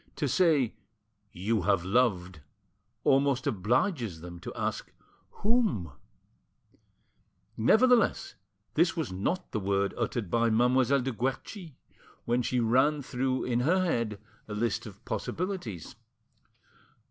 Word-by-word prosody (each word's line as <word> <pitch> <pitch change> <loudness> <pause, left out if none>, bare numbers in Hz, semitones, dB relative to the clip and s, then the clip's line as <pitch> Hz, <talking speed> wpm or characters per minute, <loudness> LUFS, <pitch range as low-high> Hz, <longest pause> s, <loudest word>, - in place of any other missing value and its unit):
To 145 - -1
say 145 -5 +3 0.6
"You 105 +4 -1
have 95 -1 +1
loved" 95 -6 +1 0.6
almost 135 -1 +2
obliges 115 - 0
them 85 0 -9
to - - -7
ask - - -3 0.5
"Whom?" 205 - +1 1.6
Nevertheless, 230 - +3 0.4
this 170 +3 +2
was 160 - -2
not 170 - -2
the 110 - -1
word 100 0 0
uttered 105 -8 -2
by 115 0 +3
Mademoiselle 125 +4 +3
de 130 +1 -2
Guerchi 135 - -4 0.5
while 120 +1 +1
she 125 +1 0
ran 130 +6 +2
through 130 0 -1
in 120 -1 0
her 180 +8 +2
head 115 - -1 0.3
a 105 - -5
list 115 +1 -1
of 100 -1 -13
possibilities. 165 - -4
120 Hz, 115 wpm, -29 LUFS, 105-145 Hz, 1.6 s, say